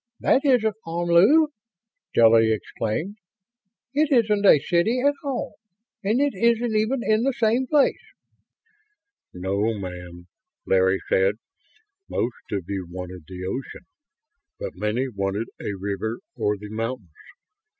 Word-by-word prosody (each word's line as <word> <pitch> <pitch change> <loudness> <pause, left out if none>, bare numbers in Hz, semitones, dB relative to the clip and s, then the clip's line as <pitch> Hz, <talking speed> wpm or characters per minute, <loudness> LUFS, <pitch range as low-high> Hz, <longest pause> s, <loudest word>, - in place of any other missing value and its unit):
That 265 - +3
isn't 230 -7 +2
Omlu!" 175 - +4 0.6
Stella 115 0 +6
exclaimed. 115 - -2 0.8
"It 295 +1 +2
isn't 215 -5 +3
a - - +8
city 175 - +1
at 285 +3 +3
all 275 -3 -4 0.5
and 215 +5 +1
it 285 0 +2
isn't 235 +2 +1
even 225 +5 +1
in 215 0 +2
the 270 +2 +1
same 235 +2 +1
place!" 290 -1 +3 1.3
"No, 100 +5 -1
ma'am," 90 -2 -8 0.4
Larry 95 0 +2
said. 95 +2 +2 0.7
"Most 120 0 -3
of 100 -4 -2
you 95 -3 -4
wanted 90 -2 -8
the 90 -1 -7
ocean, 130 - -6 0.7
but - - -5
many 105 +7 -1
wanted 100 -1 -3
a 100 - -3
river 100 +4 -3 0.2
or 105 -4 0
the 105 +1 -10
mountains. 115 -5 -4
120 Hz, 125 wpm, -24 LUFS, -, 1.3 s, a